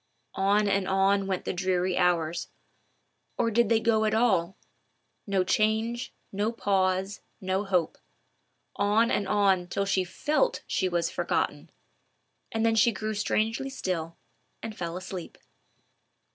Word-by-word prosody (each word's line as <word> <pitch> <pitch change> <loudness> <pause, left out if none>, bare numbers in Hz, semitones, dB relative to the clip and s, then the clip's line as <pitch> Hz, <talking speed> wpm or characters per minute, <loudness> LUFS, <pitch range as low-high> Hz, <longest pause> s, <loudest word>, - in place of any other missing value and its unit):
On 205 +2 +2
and 195 -1 +1
on 195 +1 +2
went 190 -2 -2
the - - -1
dreary 185 0 0
hours—or 180 +6 -3
did 235 0 +3
they 225 - +4
go 220 -1 +2
at 215 0 +1
all?—"no 195 -2 -2
change, 220 +4 0 0.2
no 205 +3 0
pause, 190 -3 0 0.2
no 190 +2 -1
hope;"—on 200 +4 -2
and 200 - 0
on 195 -3 +2
till 200 +3 -1
she 195 -1 +1
felt 300 - 0
she 185 - 0
was 170 -1 0
forgotten, - - -1 0.8
and 225 0 0
then 225 - +3
she 230 +2 +5
grew 215 +1 -3
strangely 220 +5 -1
still 170 -10 -4 0.5
and 225 -1 -5
fell 170 -2 -4
asleep. 185 -1 -7
195 Hz, 125 wpm, -27 LUFS, 185-220 Hz, 0.8 s, she